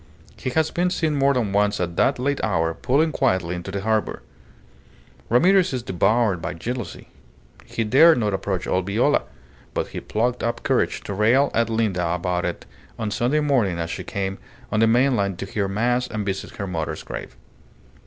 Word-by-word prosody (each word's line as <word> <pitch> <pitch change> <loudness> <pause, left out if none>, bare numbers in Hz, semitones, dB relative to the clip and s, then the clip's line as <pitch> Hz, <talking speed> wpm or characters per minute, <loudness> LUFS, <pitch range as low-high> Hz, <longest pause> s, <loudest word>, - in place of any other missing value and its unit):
He 130 - -4
has 160 +4 +1
been 180 +1 +1
seen 160 -3 0
more 140 0 +3
than 110 -6 0
once 105 0 +2
at 85 -1 -2
that 135 - +2
late 140 +3 -1
hour 80 -6 +1
pulling 140 - +1
quietly 95 - 0
into 90 +1 -6
the 100 0 -3
harbour. 110 +1 -1 1.1
Ramirez 180 - +4
is 125 -2 -2
devoured 105 -1 +1
by 85 +2 -4
jealousy. 120 +8 -6 0.6
He 115 - -2
dared 150 +9 +6
not 105 -4 0
approach 95 -1 -2
old 95 0 -1
Viola; 120 +9 +2 0.5
but - - -1
he - - -5
plucked 120 +3 -1
up 115 0 -2
courage - - +1
to 100 - -6
rail 115 +8 +3
at 115 0 +1
Linda 95 -7 0
about 90 0 -1
it - - -4 0.3
on 110 -2 -3
Sunday 125 +7 +1
morning 125 -12 +1
as 85 0 -3
she - - -5
came 95 -1 -3 0.3
on 105 - +1
the 115 - +5
mainland 115 -6 +2
to 95 - -4
hear 100 0 -2
mass 120 +5 0
and 105 -2 -4
visit 95 -1 -4
her 100 - -4
mother's 80 -5 -4
grave. - - -8
110 Hz, 185 wpm, -23 LUFS, 95-125 Hz, 1.1 s, dared